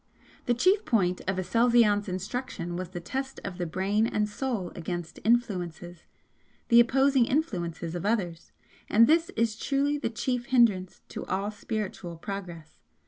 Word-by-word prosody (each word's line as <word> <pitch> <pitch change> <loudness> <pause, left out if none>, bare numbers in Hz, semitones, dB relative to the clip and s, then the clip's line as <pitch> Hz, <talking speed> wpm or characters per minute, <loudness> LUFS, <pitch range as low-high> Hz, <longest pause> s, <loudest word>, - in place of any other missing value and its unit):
The 240 - +3
chief 375 - +3
point 180 -6 +1
of 190 0 0
Aselzion's 210 +1 +3
instruction 185 -1 -4
was 180 -1 -4
the 180 -1 -6
test 265 +9 -4
of 190 -2 -6
the 175 - -1
Brain 200 +6 +1
and 210 -2 0
Soul 210 -4 -3
against 175 0 -5
'influences' 180 -7 -1 0.6
the 235 -1 +7
opposing 265 +1 +4
influences 175 - -2
of 175 - -4
others 190 -6 -2 0.4
and 225 +3 +6
this 330 +5 +3
is 225 -1 +1
truly 285 +5 0
the - - -1
chief 245 +2 -2
hindrance 225 -8 +2
to - - -6
all 195 +2 -1
spiritual 205 -5 -5
progress. 175 -4 -7
205 Hz, 145 wpm, -28 LUFS, 180-240 Hz, 0.6 s, the